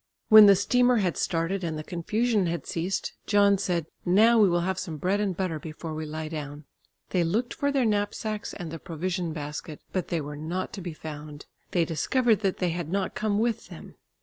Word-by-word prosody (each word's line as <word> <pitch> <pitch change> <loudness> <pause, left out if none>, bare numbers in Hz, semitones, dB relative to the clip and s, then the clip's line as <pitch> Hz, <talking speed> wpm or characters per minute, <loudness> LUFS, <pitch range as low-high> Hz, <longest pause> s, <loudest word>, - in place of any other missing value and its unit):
When 215 -1 +10
the 200 - +8
steamer 245 +6 +3
had 180 -8 +1
started 175 +5 -1
and 160 -2 -2
the 155 - -5
confusion 210 +4 0
had 170 -3 -3
ceased, 175 +3 -2
John 200 -1 +4
said, 175 -4 -1 0.2
"Now 220 +6 +5
we 205 -3 +6
will 175 0 +2
have 190 +1 -1
some 165 -5 -5
bread 190 +7 0
and 195 -4 -1
butter 180 -5 -2
before 160 +1 -7
we 155 0 -4
lie 155 +1 -5
down." 150 -2 -6 0.5
They 180 -2 +2
looked 220 +9 -1
for 285 0 0
their 270 -3 +2
knapsacks 210 0 -2
and 175 -4 -6
the 165 - -6
provision 175 +1 -3
basket, 150 0 -6
but 185 -3 -1
they 170 - -1
were 145 0 -6
not 165 +5 -4
to 195 - -6
be 175 -2 -5
found. 150 -1 -8 0.2
They 170 -2 +1
discovered 220 - +2
that 195 -3 0
they 180 - 0
had 170 -2 -4
not 195 +1 -1
come 210 -1 0
with 230 +1 0
them. - - -11
180 Hz, 205 wpm, -27 LUFS, 160-205 Hz, 0.5 s, When